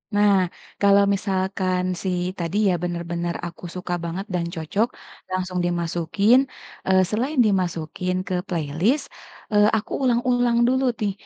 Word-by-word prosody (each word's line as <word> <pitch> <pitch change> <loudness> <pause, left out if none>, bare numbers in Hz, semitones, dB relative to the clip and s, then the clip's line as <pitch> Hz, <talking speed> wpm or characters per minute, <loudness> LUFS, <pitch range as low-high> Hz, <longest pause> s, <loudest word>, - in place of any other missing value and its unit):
Nah 205 0 +5 0.5
kalau 200 0 +6
misalkan 190 -1 -1 0.2
sih 185 -2 0 0.2
tadi 170 +3 -2
ya, - - +2
bener-bener 170 0 -3
aku 170 - -12
suka 180 -1 -4
banget 170 +4 -4
dan 175 -1 0
cocok, 175 +8 0 0.4
langsung 185 -1 -2
dimasukin, 175 +6 +2 0.5
eee, 190 0 +5
selain 255 +7 -1
dimasukin 180 -2 -1
ke 185 - -1
playlist, 175 - 0 0.5
eee, 210 0 +5
aku 210 - -6
ulang-ulang 245 -1 +2
dulu 260 +1 +2 0.2
nih, 205 -2 0
185 Hz, 130 wpm, -23 LUFS, 175-210 Hz, 0.5 s, kalau